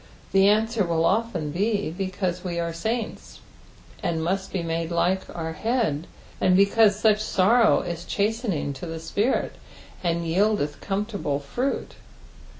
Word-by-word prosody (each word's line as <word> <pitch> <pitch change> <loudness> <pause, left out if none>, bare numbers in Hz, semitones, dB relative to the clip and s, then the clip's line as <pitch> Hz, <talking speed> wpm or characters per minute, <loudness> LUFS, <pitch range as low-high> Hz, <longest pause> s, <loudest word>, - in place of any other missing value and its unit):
The 195 0 +5
answer 220 +1 +3
will 165 -2 +1
often 195 -8 0
be 200 +1 0
because 185 0 -3
we 175 -2 -3
are 170 0 -2
saints, 220 +6 -4 0.6
and 165 -1 -1
muat 190 +4 -2
be 185 -3 -2
made 165 0 -2
like 180 +2 +1
our 160 -1 -3
Head, 210 - -1 0.3
and 185 0 +4
because 200 +1 +5
such 215 -1 +3
sorrow 215 +3 +4
is 170 -1 -5
chaateninK 205 - -1
to 170 - -7
the 165 0 -5
spirit, 205 +10 -1 0.5
and 170 -1 0
yieldeth 175 -3 +1
comfortable 200 -7 -2
fruit. 245 - -3
190 Hz, 140 wpm, -25 LUFS, 165-215 Hz, 0.6 s, The